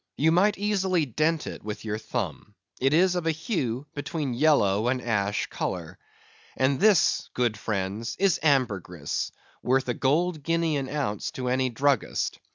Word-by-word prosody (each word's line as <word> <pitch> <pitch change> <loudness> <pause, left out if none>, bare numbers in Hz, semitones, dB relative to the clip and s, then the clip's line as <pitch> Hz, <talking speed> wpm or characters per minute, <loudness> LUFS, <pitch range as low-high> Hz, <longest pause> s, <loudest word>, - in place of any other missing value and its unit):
You 160 +3 +3
might 200 +5 +3
easily 190 -5 +1
dent 155 +5 0
it - - -7
with 105 +1 -6
your 105 0 -2
thumb; 105 - -5 0.2
it 135 +1 +2
is 180 +4 +4
of 175 -2 -2
a - - +4
hue 145 - -2
between 145 -2 -3
yellow 120 -7 +3
and 130 +1 +1
ash 105 -4 0
colour. - - -5 0.6
And 130 0 +2
this, 205 -5 +4
good 120 -3 +1
friends, 105 +2 -3
is 195 -3 +2
ambergris, 100 - 0 0.3
worth 130 +1 +1
a - - +2
gold 155 +6 +1
guinea 165 +1 0
an 135 -2 -3
ounce 135 -9 -2
to 125 -1 -3
any 130 0 +1
druggist. 135 +1 0
135 Hz, 160 wpm, -26 LUFS, 110-160 Hz, 0.6 s, is